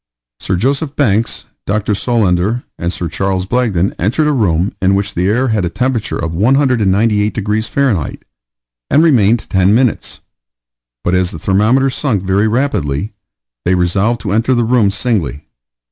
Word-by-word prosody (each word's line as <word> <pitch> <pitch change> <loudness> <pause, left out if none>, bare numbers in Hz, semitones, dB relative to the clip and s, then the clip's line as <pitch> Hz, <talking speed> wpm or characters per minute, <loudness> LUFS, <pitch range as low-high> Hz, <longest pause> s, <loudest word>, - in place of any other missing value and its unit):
Sir 95 - -2
Joseph 140 - -1
Banks, 115 -5 0 0.2
Dr. 105 +1 0
Solander, 105 0 0 0.2
and 85 0 -2
Sir 90 - -4
Charles 95 +1 -2
Blagden 100 -5 0
entered 120 - +1
a - - +2
room 95 - 0
in 95 +1 +3
which 100 +1 -2
the 90 +2 0
air 125 +5 +1
had 110 -4 0
a 85 - -1
temperature 125 0 -2
of 85 -1 -3
198 110 - +2
degrees 110 +1 -1
Fahr., 120 - 0 0.8
and 155 - +4
remained 120 -8 +3
ten 95 +2 +2
minutes; 125 -1 -1 0.8
but 90 - 0
as 90 -1 +2
the 80 - -7
thermometer 110 - +2
sunk 120 -8 -1
very 100 +3 +1
rapidly, 105 - -1 0.5
they 90 - +2
resolved 95 +6 0
to 105 - -3
enter 115 +5 +1
the 120 - +1
room 115 -3 +2
singly. 95 - -2
105 Hz, 155 wpm, -15 LUFS, 95-120 Hz, 0.8 s, and